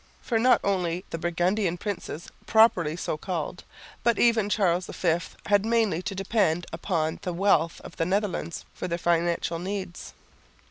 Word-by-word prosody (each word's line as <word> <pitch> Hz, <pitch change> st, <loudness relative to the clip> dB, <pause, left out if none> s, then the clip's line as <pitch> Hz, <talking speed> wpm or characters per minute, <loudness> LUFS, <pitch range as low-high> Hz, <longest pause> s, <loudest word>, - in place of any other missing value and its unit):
For 230 Hz, -3 st, 0 dB
not 250 Hz, +2 st, +5 dB
only 180 Hz, -2 st, 0 dB
the 165 Hz, -, -3 dB
Burgundian 175 Hz, +2 st, 0 dB
princes 180 Hz, -4 st, -5 dB, 0.2 s
properly 185 Hz, -9 st, +4 dB
so 170 Hz, -, -3 dB
called, 175 Hz, 0 st, -4 dB, 0.4 s
but 235 Hz, -2 st, +3 dB
even 225 Hz, -3 st, +3 dB
Charles 180 Hz, -4 st, +1 dB
V, 170 Hz, -2 st, +1 dB, 0.3 s
had 205 Hz, -1 st, +3 dB
mainly 220 Hz, -6 st, +1 dB
to 195 Hz, -, -4 dB
depend 190 Hz, -4 st, +1 dB
upon 165 Hz, -2 st, -1 dB
the 180 Hz, -, -3 dB
wealth 170 Hz, -3 st, +2 dB
of -, -, -11 dB
the 165 Hz, -, +1 dB
Netherlands 190 Hz, -4 st, -2 dB
for -, -, -5 dB
their 170 Hz, -1 st, -1 dB
financial 170 Hz, 0 st, 0 dB
needs. 190 Hz, -1 st, -5 dB
180 Hz, 150 wpm, -26 LUFS, 170-205 Hz, 0.4 s, not